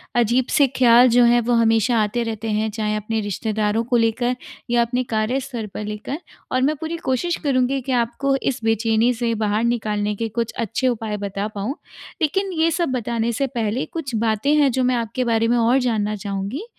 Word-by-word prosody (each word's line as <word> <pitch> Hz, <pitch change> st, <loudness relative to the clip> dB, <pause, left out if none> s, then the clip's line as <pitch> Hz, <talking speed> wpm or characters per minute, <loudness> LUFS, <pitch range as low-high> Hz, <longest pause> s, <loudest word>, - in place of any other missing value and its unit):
अजीब 240 Hz, +2 st, +2 dB
से 285 Hz, -2 st, +4 dB
ख्याल 245 Hz, 0 st, +6 dB
जो 245 Hz, +1 st, +5 dB
है 240 Hz, 0 st, +5 dB
वो 240 Hz, +1 st, 0 dB
हमेशा 230 Hz, +1 st, +3 dB
आते 235 Hz, +3 st, -1 dB
रहते 225 Hz, -1 st, -4 dB
हैं 215 Hz, +1 st, 0 dB
चाहे 215 Hz, 0 st, -2 dB
अपने 215 Hz, +1 st, -2 dB
रिश्तेदारों 210 Hz, +2 st, -1 dB
को 245 Hz, +1 st, +1 dB
लेकर 235 Hz, +2 st, +1 dB, 0.3 s
या 240 Hz, 0 st, +3 dB
अपने 245 Hz, +2 st, 0 dB
कार्य 220 Hz, +5 st, +1 dB
स्तर 245 Hz, -5 st, -6 dB
पर -, -, -5 dB
लेकर 210 Hz, +7 st, -5 dB, 0.3 s
और 255 Hz, -, +1 dB
मैं 295 Hz, +4 st, +2 dB
पूरी 320 Hz, +3 st, -5 dB
कोशिश 300 Hz, +7 st, 0 dB
करूँगी 270 Hz, -1 st, +1 dB
कि 265 Hz, +1 st, -5 dB
आपको 250 Hz, +3 st, +1 dB
इस 265 Hz, -2 st, -1 dB
बेचैनी 225 Hz, +2 st, +2 dB
से 230 Hz, 0 st, -1 dB
बाहर 215 Hz, +1 st, 0 dB
निकालने 210 Hz, -3 st, -1 dB
के 225 Hz, +2 st, -2 dB
कुछ 230 Hz, +1 st, -2 dB
अच्छे 235 Hz, +3 st, -1 dB
उपाय 220 Hz, -3 st, -2 dB
बता 200 Hz, 0 st, -3 dB
पाऊँ। 210 Hz, +8 st, -3 dB, 0.5 s
लेकिन 385 Hz, +6 st, 0 dB
ये 330 Hz, -, +4 dB
सब 335 Hz, -1 st, 0 dB
बताने 235 Hz, -1 st, -1 dB
से 275 Hz, +5 st, 0 dB
पहले 225 Hz, +2 st, -1 dB
कुछ 275 Hz, -8 st, -4 dB
बातें 220 Hz, +5 st, +1 dB
हैं 285 Hz, -3 st, +4 dB
जो 260 Hz, +1 st, 0 dB
मैं 250 Hz, 0 st, +2 dB
आपके 235 Hz, +2 st, -2 dB
बारे 230 Hz, -1 st, +2 dB
में 240 Hz, +1 st, +2 dB
और 235 Hz, +3 st, +3 dB
जानना 215 Hz, -4 st, 0 dB
चाहूँगी? 200 Hz, -, -4 dB
235 Hz, 200 wpm, -21 LUFS, 220-255 Hz, 0.5 s, ख्याल